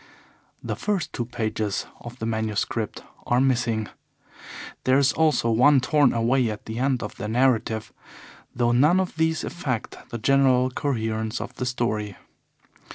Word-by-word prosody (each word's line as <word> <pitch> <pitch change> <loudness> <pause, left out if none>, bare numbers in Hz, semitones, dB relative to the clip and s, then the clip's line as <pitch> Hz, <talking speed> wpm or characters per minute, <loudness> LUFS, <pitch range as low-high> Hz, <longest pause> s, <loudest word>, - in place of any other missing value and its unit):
The - - -3
first 205 -5 -2
two 120 - -2
pages 110 -3 -2
of 120 +1 -10
the 110 - -4
manuscript 110 -1 -2 0.2
are 120 - +3
missing. 120 -5 +1 1.0
There 130 +1 +4
is 140 0 +3
also 155 -7 +2
one 135 +5 +5
torn 145 0 +3
away 120 +1 +2
at 105 -1 -6
the 110 +1 -5
end 130 -1 0
of 105 - -7
the 105 - -4
narrative, 115 -2 +1 0.6
though 120 -1 +2
none 150 +9 +4
of 185 -3 -2
these 160 0 0
affect 135 -10 -5
the 120 - -4
general 130 +1 +3
coherence 110 -4 -2
of - - -6
the 125 - -4
story. 110 -5 -2
120 Hz, 150 wpm, -24 LUFS, 110-135 Hz, 1.0 s, one